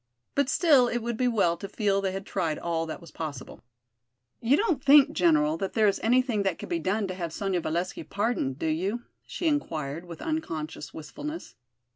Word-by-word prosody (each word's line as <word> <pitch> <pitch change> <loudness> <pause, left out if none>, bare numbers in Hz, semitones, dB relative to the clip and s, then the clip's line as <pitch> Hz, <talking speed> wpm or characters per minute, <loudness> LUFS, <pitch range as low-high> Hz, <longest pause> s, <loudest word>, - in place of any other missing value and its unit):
But 280 -2 +1
still 285 -8 +5
it 240 - -1
would 235 0 -2
be 250 +2 +1
well 200 -8 +2
to 195 +3 -7
feel 200 -3 +1
they 195 -1 0
had 195 +1 -5
tried 165 -5 -1
all 165 -1 -2
that 160 - -5
was 170 - -13
possible. 145 -5 -7 0.8
"You 255 +5 +3
don't 345 - 0
think, 285 +1 +7
General, 155 - +3
that 195 +2 -3
there 220 -2 +3
is 200 - +1
anything 245 -2 +2
that 195 -4 0
could - - -8
be 170 - 0
done 200 +5 0
to 185 - -4
have 170 -3 -4
Sonya 185 +1 -1
Valesky 170 +4 -2
pardoned, 200 - -1
do - - -4
you?" 190 +10 -1 0.2
she 350 - -5
inquired, 165 - -1
with 170 -2 -9
unconscious 160 - -4
wistfulness. 300 - -7
195 Hz, 195 wpm, -27 LUFS, 165-245 Hz, 0.8 s, think